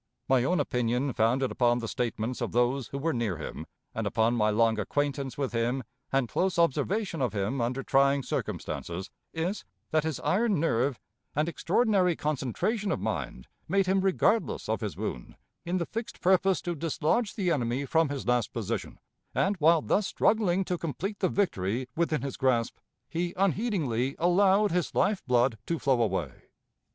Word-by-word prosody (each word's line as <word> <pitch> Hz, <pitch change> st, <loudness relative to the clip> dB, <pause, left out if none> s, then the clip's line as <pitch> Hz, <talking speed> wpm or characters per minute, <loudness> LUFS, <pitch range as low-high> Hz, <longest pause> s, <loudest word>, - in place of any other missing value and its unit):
My 130 Hz, -2 st, +3 dB
own 175 Hz, +6 st, +1 dB
opinion, 125 Hz, 0 st, 0 dB
founded 125 Hz, +4 st, +2 dB
upon 120 Hz, -1 st, +2 dB
the 115 Hz, -2 st, -4 dB
statements 120 Hz, 0 st, -2 dB
of 120 Hz, -, -2 dB
those 120 Hz, +1 st, +1 dB
who 140 Hz, -, -5 dB
were 160 Hz, +3 st, 0 dB
near 115 Hz, -, -1 dB
him, 75 Hz, -, -7 dB, 0.3 s
and -, -, -2 dB
upon 115 Hz, +2 st, +2 dB
my 110 Hz, -2 st, +2 dB
long 110 Hz, +1 st, +2 dB
acquaintance 140 Hz, +3 st, -2 dB
with 140 Hz, -2 st, -1 dB
him 120 Hz, +3 st, 0 dB, 0.3 s
and 135 Hz, -2 st, +2 dB
close 185 Hz, +8 st, 0 dB
observation 170 Hz, +3 st, +1 dB
of 125 Hz, -5 st, 0 dB
him 105 Hz, +6 st, -1 dB
under 125 Hz, +3 st, -1 dB
trying 140 Hz, 0 st, +3 dB
circumstances, 90 Hz, -4 st, -4 dB, 0.2 s
is, 175 Hz, +6 st, -2 dB, 0.3 s
that 155 Hz, -, +3 dB
his 160 Hz, -4 st, -2 dB
iron 210 Hz, -2 st, +2 dB
nerve 135 Hz, -4 st, +1 dB, 0.4 s
and 150 Hz, +2 st, +1 dB
extraordinary 185 Hz, 0 st, +2 dB
concentration 155 Hz, -, -1 dB
of -, -, -1 dB
mind 85 Hz, -, -4 dB, 0.2 s
made 195 Hz, 0 st, +2 dB
him 190 Hz, +1 st, +2 dB
regardless 195 Hz, +4 st, +1 dB
of -, -, -1 dB
his -, -, -4 dB
wound, -, -, -5 dB, 0.3 s
in 175 Hz, +2 st, 0 dB
the 170 Hz, -, -1 dB
fixed 230 Hz, +4 st, -6 dB
purpose 190 Hz, 0 st, +3 dB
to 175 Hz, -, -2 dB
dislodge 165 Hz, -, 0 dB
the 185 Hz, -4 st, 0 dB
enemy 125 Hz, -1 st, 0 dB
from 160 Hz, +2 st, +2 dB
his 140 Hz, -2 st, -4 dB
last 125 Hz, -3 st, +1 dB
position, -, -, -4 dB, 0.4 s
and, 195 Hz, +2 st, +2 dB
while 165 Hz, 0 st, +4 dB
thus 205 Hz, -1 st, +1 dB
struggling 195 Hz, -4 st, +2 dB
to 180 Hz, -1 st, -2 dB
complete 195 Hz, +6 st, -4 dB
the 185 Hz, -, +2 dB
victory 125 Hz, -, 0 dB
within 160 Hz, -4 st, 0 dB
his 140 Hz, -, -4 dB
grasp, 125 Hz, -3 st, +1 dB, 0.3 s
he 175 Hz, +1 st, -3 dB
unheedingly 165 Hz, -, 0 dB
allowed 195 Hz, +4 st, +4 dB
his 180 Hz, 0 st, -1 dB
life 205 Hz, -2 st, +2 dB
blood 120 Hz, -2 st, +2 dB
to 170 Hz, -, 0 dB
flow 135 Hz, -5 st, +2 dB
away. 95 Hz, -, 0 dB
140 Hz, 170 wpm, -28 LUFS, 120-180 Hz, 0.4 s, while